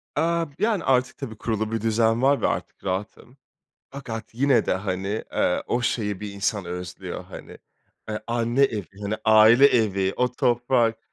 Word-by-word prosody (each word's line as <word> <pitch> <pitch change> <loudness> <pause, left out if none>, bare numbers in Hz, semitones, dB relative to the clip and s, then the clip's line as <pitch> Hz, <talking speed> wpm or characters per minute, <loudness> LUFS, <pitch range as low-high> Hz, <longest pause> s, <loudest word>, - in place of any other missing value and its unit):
A, 165 +2 +1
b 140 - -22
yani 215 -3 +1
artık 130 -1 +1
tabii 120 -7 -7
kurulu 110 -1 -2
bir 115 -2 -2
düzen 115 +1 +2
var 140 +1 +3
ve - - +2
artık - - -4
rahatım. 100 +7 -5 0.5
Fakat 120 -6 -7
yine 135 +2 +2
de - - +1
hani, 95 +2 -3
eee, 90 - +1
o 120 - 0
şeyi 105 -5 -1
bir 105 -1 -6
insan 100 -1 -2
özlüyor, 90 0 -6
hani, - - -11 0.5
eee, 105 - -3
anne 120 +2 0
evi, 110 -8 0 0.2
hani, 100 +1 -2
aile 110 +5 +7
evi, 100 -6 +1
o 125 0 +1
toprak 120 -2 +1
115 Hz, 165 wpm, -24 LUFS, 105-125 Hz, 0.5 s, aile